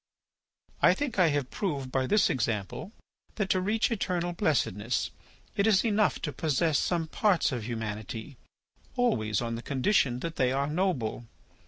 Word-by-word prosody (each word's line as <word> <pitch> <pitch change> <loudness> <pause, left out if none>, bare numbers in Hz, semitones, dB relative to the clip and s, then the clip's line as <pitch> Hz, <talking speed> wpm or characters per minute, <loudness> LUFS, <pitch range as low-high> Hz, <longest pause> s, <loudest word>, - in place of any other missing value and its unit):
"I - - +6
think 275 -8 -2
I 180 - +6
have 145 -4 -1
proved 140 -10 -3
by 130 -1 0
this 210 +6 +4
example 120 - -2 0.4
that, 205 -3 -1
to 185 - +2
reach 215 +5 +1
eternal 175 -5 -1
blessedness, 120 - 0 0.4
it 200 - +2
is 205 -2 +4
enough 210 - +2
to 150 - -2
possess 155 0 +1
some 170 -2 0
parts 185 +1 +2
of 120 -5 -3
humanity, 110 +2 -5 0.6
always 110 - +1
on 115 0 -3
the 115 - -4
condition 130 - +1
that 165 -1 -4
they 125 -1 +2
are 135 +1 +1
noble. 150 - -1
145 Hz, 155 wpm, -29 LUFS, 120-190 Hz, 0.6 s, I